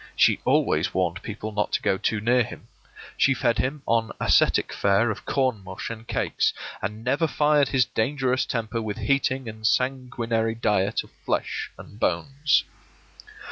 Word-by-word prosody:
She - - +4
always - - +2
warned 90 0 0
people 110 +1 -6
not 105 0 -1
to - - +1
go 100 -2 +2
too 110 - 0
near 120 +4 +3
him. 115 - -6 0.5
She 135 - +4
fed 120 0 +1
him 140 +2 -1
on 115 -1 +1
ascetic - - +3
fare 100 +3 +2
of 105 - -7
corn 130 -7 0
mush 95 +4 -6
and 115 0 -9
cakes, - - 0 0.3
and 105 +3 -4
never 140 +6 +1
fired 150 -2 +3
his 130 -2 +2
dangerous 130 +3 0
temper 115 -1 -2
with 105 -2 -4
heating 135 -2 0
and 110 0 -8
sanguinary 120 -2 0
diet 105 -3 +1
of - - -18
flesh - - -2
and 105 - -13
bones. 140 - +1
115 Hz, 160 wpm, -25 LUFS, 105-130 Hz, 0.5 s, She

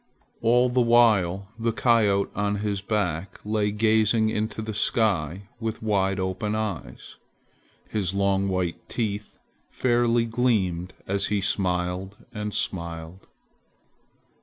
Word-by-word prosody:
All 120 +2 +4
the 125 0 +2
while 105 -6 +4
the 115 0 +1
coyote 110 -5 +2
on 100 0 0
his 100 -1 -2
back 100 -4 -2
lay 105 -1 +1
gazing 110 +1 +3
into 110 0 -2
the 110 0 -4
sky 100 - +1 0.2
with 110 -1 -4
wide 95 -2 +1
open 95 +3 -2
eyes. 110 -5 -5 0.7
His 100 -4 -1
long 100 0 +1
white 90 -2 -2
teeth 105 -3 -3 0.3
fairly 120 -1 +2
gleamed 105 -7 0
as 100 +1 0
he 105 0 0
smiled 95 0 -1 0.2
and 105 -1 -3
smiled. 85 -1 -5
105 Hz, 115 wpm, -25 LUFS, 95-110 Hz, 0.7 s, All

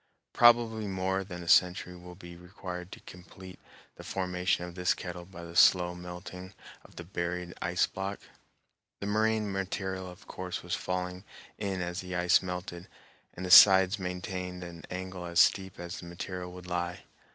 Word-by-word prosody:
Probably 115 -3 +5
more 95 0 -1
than 95 -2 -8
another - - -11
century 90 0 +3
will 90 0 -11
be 85 -2 -11
required 90 0 -8
to - - -9
complete 90 +1 -12 0.4
the - - -10
formation 90 -1 -1
of 90 - -9
this 90 0 +1
kettle 90 -1 -7
by 85 -2 -11
the 85 0 -10
slow 90 -1 +5
melting 90 +2 -9 0.3
of - - -18
the 85 - -7
buried 85 0 -4
ice 90 0 +2
block. 95 +1 -5 0.8
The - - -5
moraine 110 0 +1
material 95 -1 -3
of 90 - -14
course 90 0 -5
was 90 0 -5
falling 90 0 -3 0.4
in 95 -3 -2
as 90 +1 -4
the 90 0 -6
ice 90 0 +4
melted, 90 -1 -6 0.5
and 95 - -5
the 90 - -3
sides 95 +1 +9
maintained 90 0 -5
an 85 -1 -9
angle 95 0 -6
as 85 -1 0
steep 95 -1 +3
as 85 0 -6
the 85 - -9
material 90 +1 -6
would 90 0 -11
lie. 90 0 -3
90 Hz, 170 wpm, -30 LUFS, 90-95 Hz, 0.8 s, sides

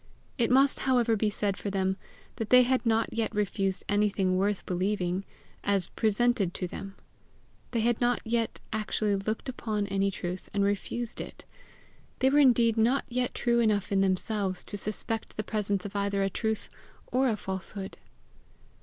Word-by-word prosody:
It 235 - +3
must, 270 +2 +4
however, 240 -3 +4
be 215 0 +1
said 205 -1 -1
for 205 - -4
them, 190 -1 0 0.4
that 225 -2 -3
they 250 0 +8
had 255 +1 +1
not 225 0 +2
yet 230 -1 -1
refused 195 -2 0
anything 200 -2 +2
worth 200 +1 0
believing 185 0 -1 0.4
as 195 -3 +1
presented 220 -3 +1
to 185 - -2
them. 195 +2 -7 0.7
They 230 - 0
had 235 +1 +1
not 245 0 +2
yet 230 0 -1
actually 215 -1 0
looked 215 +5 -3
upon 215 -5 -2
any 195 0 +1
truth 180 -1 -5
and 200 - +3
refused 215 +4 -2
it. - - -9 0.7
They 265 +1 +3
were 290 - +5
indeed 235 -5 +5
not 240 +5 +3
yet 250 0 -1
true 235 0 +2
enough 210 -4 +1
in 195 -1 +3
themselves 190 0 0
to - - -5
suspect 215 +2 -4
the 215 - -1
presence 205 -3 -1
of 205 - -7
either 200 0 0
a 195 - 0
truth 220 +1 -2 0.4
or 260 +1 +3
a 220 - 0
falsehood. 190 0 -6
210 Hz, 165 wpm, -29 LUFS, 195-230 Hz, 0.7 s, they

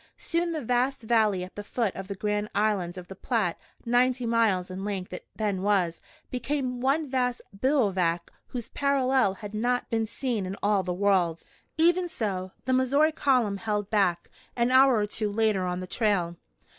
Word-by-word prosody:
Soon 340 0 -1
the 315 -4 -3
vast 250 +2 0
valley 215 -5 +2
at 185 - -9
the 205 - -6
foot 220 -1 -1
of 190 0 -6
the 200 - -5
Grand 210 +1 -1
Island 200 -4 0
of 180 -1 -8
the 190 - -9
Platte 210 -4 -1 0.3
ninety 245 +1 +2
miles 220 -6 +1
in 190 +1 -5
length 195 -3 -4
it - - -8
then 205 -4 -1
was 190 -4 +1 0.3
became 255 0 -2
one 285 +4 +1
vast 250 -2 0
bivouac 195 - +1 0.2
whose 240 -3 -6
parallel 265 -7 +2
had 210 -1 -9
not 245 +4 -1
been 225 -1 0
seen 225 -4 -2
in 195 +2 -5
all 205 -1 +3
the 180 -1 -3
world. 180 -3 +1 0.3
Even 350 +2 +3
so, 190 - -3
the 260 - +1
Missouri 275 +5 +3
column 250 -9 +1
held 210 -1 -2
back, 185 -5 +1 0.3
an 240 +1 +1
hour 260 0 +6
or 210 -2 +2
two 210 0 -3
later 210 -3 +1
on 180 0 -2
the - - -4
trail. 180 -4 0
215 Hz, 180 wpm, -27 LUFS, 190-255 Hz, 0.3 s, hour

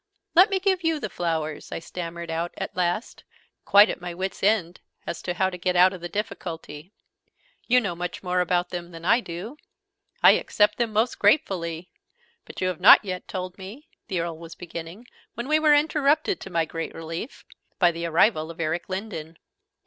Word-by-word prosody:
"Let 365 +4 +7
me 390 -1 0
give 375 -2 +1
you 325 -2 +1
the 215 - -5
flowers!" 160 -3 -3
I - - -3
stammered 170 0 -6
out 165 +2 -3
at - - -5
last, 180 +5 -2 0.4
quite 205 +2 +7
'at - - -5
my 175 -1 -6
wit's 190 +1 -4
end' 190 -4 +1 0.2
as - - -5
to 175 - -3
how 190 +1 +1
to 180 - -8
get 180 +1 0
out 180 +2 +6
of 185 - -9
the 175 - -5
difficulty. 170 -5 -6 0.8
"You 250 +1 +5
know 200 -7 -2
much 175 +2 -5
more 180 0 0
about 180 0 +1
them 175 -1 -5
than 165 -1 -10
I 230 +6 +5
do!" 205 - -7 0.7
"I - - +10
accept 210 +1 +2
them 235 -2 0
most 220 +3 0
gratefully! 180 - +1 0.5
But - - -9
you 185 - +1
have 180 -1 -5
not 205 - +8
yet 185 -2 -5
told 185 0 -6
me 220 +12 -10
" - - -57
the 185 -6 -1
Earl 165 -1 -5
was 165 -1 -10
beginning, 170 +5 -8 0.3
when 240 +2 -5
we 305 +1 +3
were 305 -1 +5
interrupted, 305 +4 +2
to - - -9
my 165 -2 +1
great 165 +1 -6
relief, 165 - -7 0.3
by 175 -2 +4
the 170 0 -4
arrival 160 -1 +2
of 165 - -10
Eric 165 +2 -2
Lindon. 185 -5 -6
180 Hz, 195 wpm, -25 LUFS, 170-220 Hz, 0.8 s, I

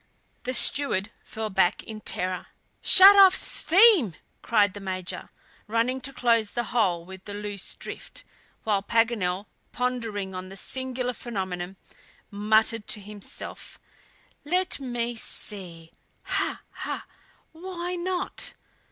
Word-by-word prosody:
The 255 +1 -1
steward 225 -9 +4
fell 220 -1 -5
back 190 0 +2
in 215 -1 -9
terror. 185 -2 -2 0.3
"Shut 390 +2 +9
off 380 -1 +8
steam!" 365 - +5 0.3
cried 205 -4 +2
the 205 - -8
Major, 185 -2 -5 0.4
running 230 +4 0
to 275 - -2
close 230 -4 +1
the 240 - -1
hole 180 -8 +1
with 190 +1 -12
the 205 - -7
loose 205 -2 -4
drift, - - -8 0.4
while 205 -3 +1
Paganel 205 -4 0 0.3
pondering 225 -6 -3
on 185 0 -6
the 195 - -10
singular 255 +2 -4
phenomenon 190 -6 -5 0.6
muttered 215 +1 +1
to - - 0
himself: 205 0 -9 0.6
"Let 360 +4 0
me 240 -3 -3
see! 175 -7 -5 0.3
ha! - - -2
ha! - - -6 0.5
Why 350 +1 -6
not?" 360 +1 -1
220 Hz, 120 wpm, -26 LUFS, 195-255 Hz, 0.6 s, Shut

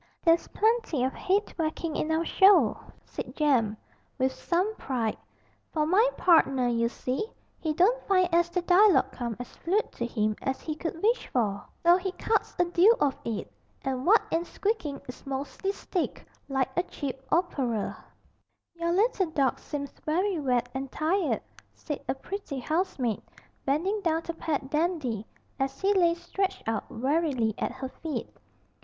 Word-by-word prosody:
'There's 330 -1 +4
plenty 440 - +1
of 260 - 0 0.2
'ead 405 +2 +3
whackin' 315 0 -1
in 305 - -1
our 320 +1 +1
show,' 390 +3 +6 0.3
said - - -7
Jem, 245 -9 +2 0.4
with 260 0 +2
some 365 +9 -1
pride, 240 - -2 0.6
'for 305 -2 +1
my 405 +10 +4
partner, 275 -8 +4
you 235 -1 +1
see, 255 - -3 0.3
he 315 - -1
don't 395 +11 +3
find 370 -2 +4
as 345 0 +4
the 355 0 -1
dialogue 375 +2 +5
come 235 -3 -4
as 245 - -8
fluid 400 +6 0
to - - -5
him 215 -3 0
as 265 0 -2
he 310 - -4
could 330 +2 -5
wish 470 +4 +2
for, 205 -5 0 0.2
so 345 +1 +7
he 375 0 -3
cuts 435 0 0
a 355 - +4
deal 355 +6 +5
of 275 -2 +2
it, 225 -3 -4 0.3
and 265 +1 -2
what 440 +4 +6
ain't 335 +1 0
squeakin' 395 -10 -2
is 250 - -9
mostly 275 +8 -2
stick 375 -3 -3 0.2
like 265 -1 0
a 350 - +3
cheap 280 -7 -5
operer.' 270 - 0 0.8
'Your 340 0 -1
little 400 -1 +2
dog 275 -5 +1
seems 280 -2 -5
very 360 +3 +1
wet 250 -4 +1
and 265 0 -4
tired,' 335 +3 0 0.3
said 295 -3 -5
a - - +1
pretty 350 0 -6
housemaid, 265 - -1 0.4
bending 365 +10 +1
down 330 -3 +1
to 335 - -4
pat 290 -4 -3
Dandy, 300 - 0 0.3
as 270 0 -1
he 395 +1 +3
lay 345 -3 +4
stretched 380 - -3
out 225 -2 -2
wearily 265 -3 0
at - - -1
her 260 0 -5
feet. 320 -3 -3
320 Hz, 160 wpm, -28 LUFS, 265-365 Hz, 0.8 s, so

